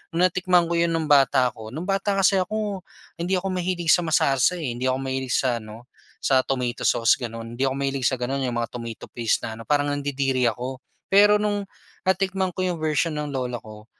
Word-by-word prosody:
nung 175 - +3
natikman 185 -1 +3
ko 170 - +1
'yon 170 - +3
nung 155 -2 -1
bata 135 -3 +4
ko, 110 0 -10
nung 155 +9 -6
bata 195 +1 0
kasi 195 0 +4
ako, 205 0 -2 0.4
hindi 180 +3 0
ako 190 +1 -2
mahilig 180 -2 0
sa 175 - +5
masarsa, 140 +1 +3
eh. 155 -8 -3
Hindi 125 +2 -2
ako 130 - +1
mahilig 130 -2 -2
sa 125 -3 +1
ano 110 +3 -12 0.4
sa 130 -1 +4
tomato 125 -2 -2
sauce, 115 0 +3
gano'n. 115 0 -6
Hindi 135 +3 0
ako 130 - -1
mahilig 135 -2 0
sa 130 - +1
gano'n, 135 +3 -2
yung 120 - -4
mga 115 -1 -2
tomato 115 -2 -7
paste 115 -2 0
na 110 - -5
ano, - - -8
parang 145 -1 +1
nandidiri 135 -3 0
ako. 125 +2 -5 0.3
Pero 205 +1 +6
nung 205 -1 -1 0.4
natikman 190 0 +1
ko 185 - -1
yung 175 -3 -2
version 155 +1 +1
ng 150 -1 -3
lola 125 -3 -3
ko, 105 0 -12
140 Hz, 210 wpm, -24 LUFS, 125-180 Hz, 0.4 s, Pero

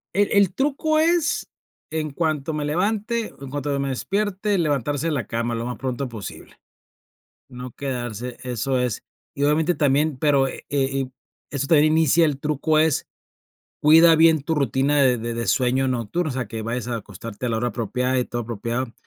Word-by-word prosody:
El 205 +1 +3
el 200 -3 +4
truco 295 +3 +1
es 335 -1 +1 0.4
en 155 -2 -3
cuanto 155 0 -1
me 150 -1 -2
levante 215 +8 -1
en 140 -1 -8
cuanto 145 0 -2
me 140 - -1
despierte, 200 +7 -1
levantarse 145 -1 0
de - - 0
la 125 -7 -2
cama 115 0 -2
lo 115 - -3
más 125 0 -4
pronto 130 0 -3
posible. 110 -4 -9 0.9
No 125 0 -8
quedarse, 125 -3 -5
eso 125 +1 -1
es 125 -3 -2 0.3
y 140 - -1
obviamente 160 +4 +2
también 145 0 +2
pero 140 -2 +3
e - - -8
eh, 135 -2 +1
y 130 -1 -5 0.4
esto 140 -1 -3
también 155 -1 +5
inicia 160 +1 +4
el 145 -3 -1
truco 155 +1 +1
es, 160 -3 +2 0.8
cuida 165 +2 +7
bien 160 -2 +5
tu 160 +2 -1
rutina 140 +2 +2
de 125 -3 +3
de 115 +1 -4
de 115 -2 -3
sueño 130 +4 +2
nocturno, 130 +7 -1
o - - -3
sea, 125 -3 -3
que 110 0 -5
vayas 115 +1 -3
a 120 - -1
acostarte 110 +3 -7
a - - 0
la 115 - 0
hora 120 +1 0
apropiada 125 +4 -1
y 125 - +1
todo 120 0 -4
apropiado 115 +2 -3
140 Hz, 185 wpm, -23 LUFS, 125-160 Hz, 0.9 s, cuida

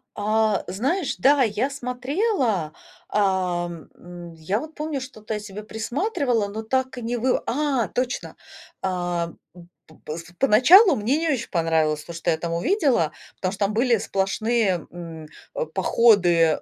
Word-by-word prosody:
А, 215 0 +1
знаешь, 270 - -1
да, 275 0 +4
я 220 +4 0
смотрела, 250 - -1 0.4
ам, 180 -4 -1
м, 175 -1 -11
я 165 +6 -2
вот 310 +3 -8
помню, 300 -2 -3
что-то 220 -4 -7
я - - -3
себе 210 0 -8
присматривала, 240 - -1
но 215 +2 -6
так 260 +2 -1
и - - -5
не 240 +1 -2
вы 250 +2 +1
А, 275 -4 0
точно. 250 0 -3 0.5
А, 175 -2 -2 0.2
м, 175 -1 -14 0.2
п 160 - -18
пс 160 +2 -5 0.2
поначалу 280 - +7
мне 240 +7 0
не 325 0 0
очень 250 -5 -1
понравилось 160 -3 +1
то, 170 - -9
что 170 +1 -3
я 160 - 0
там 170 +1 -4
увидела, 255 - +1 0.2
потому 185 - -2
что 200 0 0
там 205 - -2
были 235 0 +3
сплошные, 195 -1 0
м, 165 -2 -9 0.3
э, - - -1
походы, 180 -6 +4
215 Hz, 155 wpm, -23 LUFS, 175-260 Hz, 0.5 s, поначалу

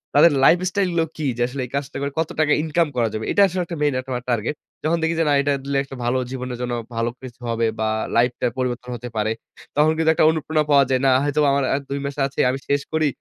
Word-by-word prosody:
তাদের 155 +2 +7
লাইফস্টাইলগুলো 180 0 +3
কী? 155 - -3
যে - - -2
আসলে 130 +1 -5
এই 125 - -14
কাজটা 140 +1 -4
করে 140 0 -2
কত 160 - 0
টাকা 150 -1 +3
ইনকাম 160 +1 +1
করা 115 -2 +2
যাবে? 110 0 -3
এটা 200 - +3
আসলে 185 0 -2
একটা 170 -2 -6
মেইন 145 -2 +2
একটা 130 +1 -8
আমার 125 0 -3
টার্গেট। 120 +4 0 0.3
যখন 165 +2 +2
দেখি 160 +1 +1
যে - - +4
না - - +4
এটা 145 0 +1
দিলে 140 0 -3
আসলে 135 - +2
একটা 135 - -9
ভালো 125 +2 +1
জীবনের 125 -2 -5
জন্য 125 0 -2 0.2
ভালো 115 +1 0
কিছু 125 -2 -10
হবে 115 0 0
বা 110 - +1 0.3
লাইফটা 125 +1 +2
পরিবর্তন 125 -1 -3
হতে 120 +1 -7
পারে। 110 +1 +1 0.4
তখন 150 +2 +4
কিন্তু 160 0 +2
একটা - - +3
অনুপ্রেরণা 160 -1 0
পাওয়া 140 -1 +7
যায়। 130 -1 +2
না - - +5
হয়তোবা 145 0 +2
আমার 140 - +1
১ 140 - -2
২ 140 0 -2
মাস 140 - -4
আছে, 140 - -10
আমি 135 +1 -2
শেষ 140 0 +2
করি। 155 -1 +2
140 Hz, 250 wpm, -22 LUFS, 125-155 Hz, 0.4 s, তাদের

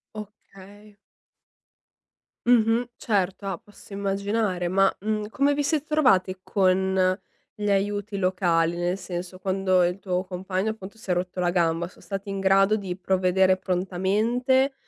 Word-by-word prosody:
Okay. 205 0 -12 1.5
Mh-mh, 235 0 +3
certo, 195 -2 -1
ah, 190 -3 -2
posso 205 0 -16
immaginare, 200 -2 -1
ma, 195 +2 +3
mhmm, 210 +1 -2
come 280 +4 +2
vi 290 0 0
siete 300 +1 0
trovati 195 - +2
con 190 -1 +2 0.4
gli 210 -1 -2
aiuti 205 +1 -1
locali, 175 -3 +1
nel 175 +2 -1
senso, 180 0 -6
quando 190 -1 +1
il 180 +2 -2
tuo 185 -1 -2
compagno 190 +3 -2
appunto 215 0 -10
si 220 - -13
è - - +4
rotto 180 +1 -3
la 175 -1 +1
gamba 170 -1 +1
so - - -18
stati 195 0 -6
in 195 0 -3
grado 195 +2 +4
di 190 -3 -4
provvedere 185 0 +2
prontamente 210 +9 +1
195 Hz, 140 wpm, -25 LUFS, 185-210 Hz, 1.5 s, è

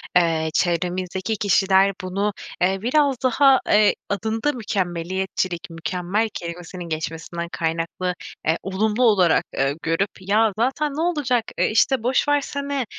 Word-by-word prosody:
eee, 165 -2 +3
çevremizdeki 180 +4 -1
kişiler 195 -1 +3
bunu, 200 +3 -1 0.3
eee, 190 +2 +2
biraz 275 +3 +2
daha, 265 +1 +5
eee, 210 0 +4
adında 220 +7 -1
mükemmeliyetçilik, 185 -3 -2
mükemmel 180 +6 -2
kelimesinin 175 0 -7
geçmesinden 165 +2 -4
kaynaklı, 165 +2 -2 0.3
eee, 160 +1 +3
olumlu 210 +5 0
olarak, 190 -8 +4
eee, 135 +1 +1
görüp: 165 +5 0
"Ya 210 +3 +2
zaten 270 +5 0
ne 310 - -3
olacak, 285 -9 +1 0.2
eee, - - +3
işte, 225 +2 +2
boş 255 +4 +1
versene, 280 -2 -1
195 Hz, 125 wpm, -22 LUFS, 175-230 Hz, 0.3 s, daha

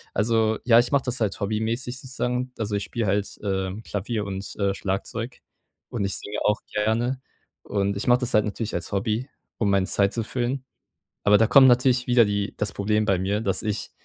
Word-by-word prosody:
Also 110 0 +2
ja, 115 -1 +6
ich 120 +3 0
mache 140 -2 +3
das 125 -1 -2
halt 110 -4 0
hobbymäßig 115 +5 -2
sozusagen. 125 -1 -3
Also, 105 -2 -2
ich 100 - -2
spiele 115 -2 -3
halt, 100 +1 -1
äh, 95 -2 -1
Klavier 105 +1 -3
und, 95 0 -6
äh, 100 -1 +1
Schlagzeug 100 +5 -4 0.5
und 100 - -2
ich 100 - -1
singe 105 +1 -5
auch 105 - +2
gerne. 115 +5 0 0.4
Und 100 -1 -1
ich 100 - -4
mache 120 0 +5
das 125 -1 -2
halt 105 -2 +4
natürlich 110 +1 -4
als 85 +3 -4
Hobby, 110 +6 -1 0.3
um 105 - +1
meine 100 -1 +2
Zeit 100 -1 +2
zu 115 - -1
füllen. 125 +3 -2 0.6
Aber 105 0 +6
da 115 - +4
kommt 130 +4 +7
natürlich 125 0 +3
wieder 120 -2 +5
die 100 0 -2
das 105 -2 -2
Problem 105 +1 +1
bei 95 -3 +2
mir, 100 +3 0
dass 95 -4 0
ich 105 -1 -3
110 Hz, 200 wpm, -24 LUFS, 100-120 Hz, 0.6 s, kommt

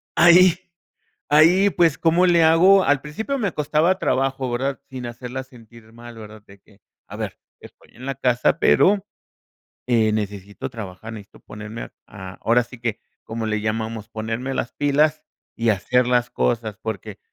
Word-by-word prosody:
ahí. 175 0 +6 0.7
Ahí, 175 +7 +5
pues, 165 -5 +2
cómo 170 +2 +3
le 170 -2 +4
hago? 185 +4 +5
Al 145 -1 +2
principio 220 - -4
me 200 -7 -1
costaba 155 +5 +1
trabajo, 135 -1 -1
¿verdad? 135 +3 -2
Sin 130 -2 -7
hacerla 125 +2 -6
sentir 115 -3 -17
mal, 120 0 -12
¿verdad? 110 -1 -12
De 100 0 -17
que 105 0 -25 0.3
a - - -9
ver, - - -5 0.2
estoy - - -17
en 125 +3 -10
la 135 - -2
casa, 125 +4 +1
pero 200 +1 +4 0.8
eh, 110 -3 +2
necesito 100 -2 -5
trabajar, 110 0 -8
necesito 105 -2 -12
ponerme 110 +2 -8
a - - -11 0.2
a 95 -2 -10
ahora 120 +2 +2
sí 120 +1 -14
que, 115 -3 -3 0.2
como 115 0 -5
le 105 -1 -1
llamamos, 110 0 -4
ponerme 115 +4 -4
las 120 - -3
pilas 150 +2 +1 0.3
y 115 0 +1
hacer 120 +5 +1
las 120 -1 +1
cosas, 110 -3 -1
porque 105 -1 -6
120 Hz, 165 wpm, -22 LUFS, 110-150 Hz, 0.8 s, ahí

